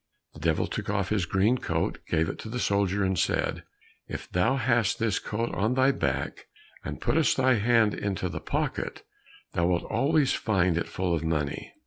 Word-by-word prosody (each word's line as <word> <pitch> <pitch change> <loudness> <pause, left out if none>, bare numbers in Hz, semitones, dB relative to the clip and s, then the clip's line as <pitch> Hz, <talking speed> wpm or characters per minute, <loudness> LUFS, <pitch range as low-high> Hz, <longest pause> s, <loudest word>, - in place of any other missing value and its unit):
The - - -12
Devil 80 0 +1
took - - -5
off 100 -2 0
his 100 -5 0
green 100 +8 +2
coat, - - -1
gave 80 0 +1
it - - -5
to 110 - -7
the 125 - -4
soldier, 100 -2 +1
and 95 -2 +1
said, - - 0 0.5
"If - - -6
thou 90 +9 +2
hast 115 -5 +2
this 115 -3 0
coat 115 +3 -3
on 110 +7 +1
thy 130 +1 +4
back 70 - -2 0.4
and - - -5
puttest 160 -1 +2
thy 130 0 +4
hand 110 -1 +3
into 95 -2 -2
the 85 - -5
pocket, - - -3 0.5
thou 85 0 +2
wilt 90 -1 +1
always 145 -1 +2
find 95 -5 +1
it 85 - -1
full 90 -2 -1
of 80 -1 -1
money." 75 -3 -2
100 Hz, 185 wpm, -27 LUFS, 85-115 Hz, 0.5 s, thy